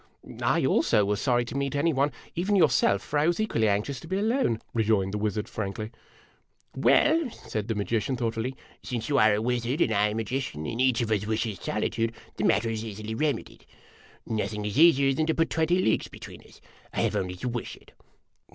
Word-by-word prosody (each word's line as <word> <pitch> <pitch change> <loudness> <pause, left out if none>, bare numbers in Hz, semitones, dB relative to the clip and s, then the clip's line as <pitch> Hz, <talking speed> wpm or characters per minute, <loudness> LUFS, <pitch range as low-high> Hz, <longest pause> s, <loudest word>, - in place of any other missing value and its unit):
" - - -11
I, - - +2
also, 105 - +3
was 105 +1 -1
sorry 120 -2 +2
to 120 - -7
meet 140 0 -1
any 155 +3 +2
one, 140 +2 +1 0.2
even 190 +4 0
yourself, 130 - +3
for 145 - -1
I 150 - +3
was 175 +3 +1
equally 115 - +1
anxious 105 +6 0
to - - -12
be 190 - -1
alone," 215 - +1
rejoined 105 -4 +1
the 105 - -2
wizard, 105 0 -2
frankly. 110 0 -5 0.5
" - - -37
Well," 315 -2 +3 0.2
said 110 -1 -3
the 115 - -1
magician, 115 +5 -1
thoughtfully, 115 +2 -2
" - - -27
since 120 +1 -4
you 140 -2 +3
are 110 -3 +5
a 105 - -1
wiz 120 0 0
ard 135 +6 -1
and 115 - +2
I 105 0 +3
a 105 - -3
magician, 115 - -3
and 115 +10 -2
each 130 -2 +3
of 115 -2 -2
us 105 -1 0
wishes 110 -2 -2
solitude, 115 +1 -1 0.2
the - - -2
matter 115 +2 +2
is 110 -1 -3
easily 110 0 -6
remedied. 145 +5 -2 0.6
Nothing 105 -1 -3
is 105 +6 -1
easier 140 -5 +6
than 155 +3 0
to 160 - +1
put 165 0 +1
twenty 165 +2 +2
leagues 110 -12 +1
between - - -11
us. - - -19 0.3
I - - -1
have - - 0
only 90 -1 -2
to 90 - -5
wish 120 -1 -4
it." - - -20
115 Hz, 215 wpm, -27 LUFS, 105-140 Hz, 0.6 s, easier